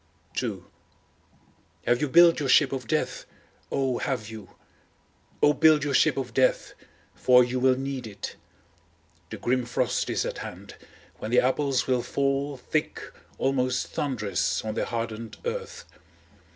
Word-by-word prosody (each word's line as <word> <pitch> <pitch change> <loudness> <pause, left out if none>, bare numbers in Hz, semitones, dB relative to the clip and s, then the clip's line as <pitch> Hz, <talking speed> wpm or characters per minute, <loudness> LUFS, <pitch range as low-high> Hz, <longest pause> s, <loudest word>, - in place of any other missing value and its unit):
II - - -4 1.2
Have 120 +1 +2
you 150 - 0
built 170 +3 +6
your 140 -3 -2
ship 135 0 +5
of 130 -3 -4
death, - - -2 0.4
O 130 -3 0
have 115 -5 -3
you? 110 -4 -11 0.9
O 145 - +6
build 155 -1 +5
your 145 -1 -1
ship - - +3
of 130 -2 -4
death, 130 -1 +1 0.4
for 125 0 +5
you 125 +1 -2
will 130 0 +3
need 135 -2 -4
it. 100 -2 -7 0.9
The - - -6
grim 125 +1 0
frost 120 +1 -1
is - - 0
at - - -4
hand, - - -9 0.5
when 110 - -5
the 125 - +4
apples 135 +1 +1
will 125 -2 +1
fall 140 +2 -1
thick, 150 +4 -2 0.4
almost 130 -2 0
thundrous, 110 -8 -1
on 110 - -2
the - - -1
hardened 115 -1 -5
earth. 475 0 -5
130 Hz, 145 wpm, -26 LUFS, 120-140 Hz, 1.2 s, built